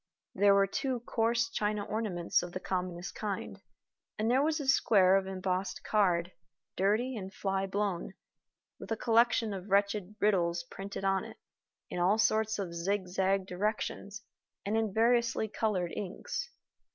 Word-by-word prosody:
There 200 +1 +5
were 200 0 +5
two 250 +5 -2
coarse 230 0 +1
china 210 -2 -1
ornaments 205 -6 0
of 175 0 -7
the - - -3
commonest 180 -1 -3
kind; 205 -3 -4 0.6
and 220 +2 +1
there 260 +2 +4
was 310 +2 +1
a 285 - -4
square 195 -8 +5
of 195 -1 +1
embossed 185 0 -2
card, 180 -4 +2 0.4
dirty 215 +7 +1
and 190 -3 -6
fly 195 0 -1
blown, 195 -2 -2 0.7
with - - -9
a 225 - 0
collection 230 -1 +3
of 190 +1 -7
wretched 200 0 +1
riddles 175 -4 +2
printed 195 +3 -7
on 195 0 +2
it, - - -10 0.5
in - - -3
all 185 +5 +3
sorts 220 0 +2
of 190 -4 -4
zigzag 190 +1 0
directions, 205 +2 -3 0.4
and 205 +2 0
in 220 -2 +1
variously 235 +1 +2
colored 195 -5 -1
inks. 205 - -4
200 Hz, 150 wpm, -31 LUFS, 185-220 Hz, 0.7 s, There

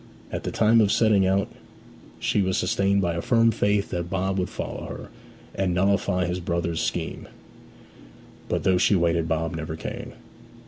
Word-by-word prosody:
At - - -4
the - - -2
time 115 +1 +4
of 105 -2 +3
setting 105 -4 +3
out 95 +1 +2 0.7
she 105 - +1
was 95 -1 0
sustained 100 0 +1
by 85 -2 0
a 85 - -2
firm 115 +1 +3
faith 105 -2 0
that 85 -1 -3
Bob 95 +1 -1
would 90 - -1
follow - - -5
her, - - -8 0.4
and 95 -2 0
nullify 95 -1 +1
his 90 +1 -2
brother's 85 -1 -2
scheme; - - -3 1.2
but - - -1
though 95 -1 +3
she 100 - +4
waited 85 -2 +1
Bob 80 +1 -1
never 80 0 -4
came. - - -7
95 Hz, 170 wpm, -25 LUFS, 85-100 Hz, 1.2 s, time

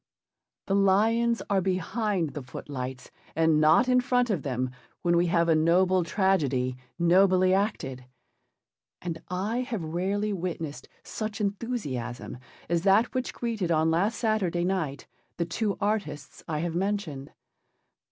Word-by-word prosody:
The 195 - -1
lions 220 +4 +3
are 195 -2 +2
behind 190 0 -1
the 145 - -6
footlights 130 0 -7 0.2
and 160 -1 +3
not 160 +12 +5
in 250 0 +4
front 245 -1 +1
of 185 -7 0
them 130 -2 -2 0.3
when 175 0 +3
we 175 +1 +3
have 170 0 +2
a 165 - +5
noble 180 +3 +3
tragedy 150 -10 +1 0.2
nobly 185 +2 +4
acted. 145 - -1 0.9
And 165 -2 -5
I 200 +6 -1
have 245 -8 -3
rarely 195 +6 -1
witnessed 165 -5 -5
such 215 -1 -5
enthusiasm 195 - -3 0.3
as 170 0 +1
that 200 +5 +3
which 255 -1 -2
greeted 225 -7 -3
on 160 -1 +3
last 195 +8 +1
Saturday 195 -7 0
night 170 -7 -2 0.3
the 170 - 0
two 200 +4 -2
artists 200 -8 -3
I 155 -1 -2
have 170 -1 -2
mentioned. 180 -7 -2
180 Hz, 135 wpm, -27 LUFS, 160-205 Hz, 0.9 s, not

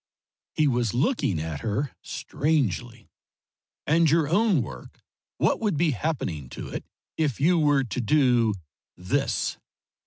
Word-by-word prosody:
He 155 - +3
was 120 -4 0
looking 125 - +1
at 80 -2 -4
her 110 - -2
strangely. 120 - -2 0.7
"And 160 +1 +4
your 160 0 +3
own 180 - +3
work 65 - -10 0.4
what - - +2
would 205 -8 0
be 165 0 +3
happening 100 - -3
to - - -6
it, - - -5 0.3
if 150 -7 0
you 170 +4 +4
were 145 -3 +3
to 125 +1 -3
do 120 -4 +3 0.4
this?" 90 0 -1
135 Hz, 130 wpm, -26 LUFS, 110-155 Hz, 0.7 s, And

